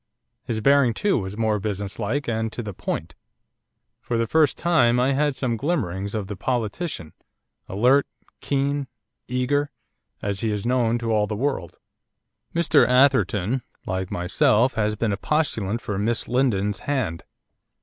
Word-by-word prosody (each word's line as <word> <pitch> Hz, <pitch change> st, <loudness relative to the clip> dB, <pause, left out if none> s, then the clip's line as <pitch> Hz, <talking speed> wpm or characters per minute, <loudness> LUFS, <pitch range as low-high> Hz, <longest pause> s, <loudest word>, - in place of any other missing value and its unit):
His 110 Hz, -2 st, -2 dB
bearing, 140 Hz, -2 st, +4 dB
too, 205 Hz, -9 st, +1 dB
was 95 Hz, +1 st, -6 dB
more 110 Hz, -2 st, +1 dB
businesslike 105 Hz, +6 st, -3 dB
and 110 Hz, -1 st, -1 dB
to 120 Hz, -, -4 dB
the 105 Hz, -2 st, -6 dB
point. 85 Hz, -1 st, -4 dB, 0.9 s
For 120 Hz, -, -2 dB
the 115 Hz, -, +1 dB
first 155 Hz, +4 st, +3 dB
time 125 Hz, -8 st, +3 dB
I 130 Hz, +2 st, +3 dB
had 145 Hz, 0 st, +1 dB
some 125 Hz, -3 st, -1 dB
glimmerings 105 Hz, -, -2 dB
of 105 Hz, -2 st, -2 dB
the 100 Hz, +1 st, -6 dB
politician, 115 Hz, -, -3 dB, 0.6 s
alert, 125 Hz, +8 st, +3 dB, 0.3 s
keen, 140 Hz, 0 st, -1 dB, 0.4 s
eager, 135 Hz, +3 st, 0 dB, 0.5 s
as 100 Hz, -1 st, -3 dB
he 110 Hz, -, -1 dB
is 105 Hz, 0 st, -3 dB
known 120 Hz, -2 st, +2 dB
to 115 Hz, -1 st, -2 dB
all 105 Hz, -1 st, +2 dB
the 105 Hz, -, -3 dB
world. 125 Hz, -, -2 dB, 0.8 s
'Mr 170 Hz, -1 st, +4 dB
Atherton, 125 Hz, -3 st, +3 dB, 0.2 s
like 95 Hz, 0 st, -2 dB
myself, 105 Hz, +7 st, +2 dB
has 105 Hz, -1 st, 0 dB
been 105 Hz, -1 st, 0 dB
a -, -, -2 dB
postulant 120 Hz, -9 st, 0 dB
for 100 Hz, -4 st, -3 dB
Miss 115 Hz, +2 st, -1 dB
Lindon's 105 Hz, -6 st, +1 dB
hand. 130 Hz, -, -2 dB
115 Hz, 150 wpm, -24 LUFS, 105-135 Hz, 0.9 s, bearing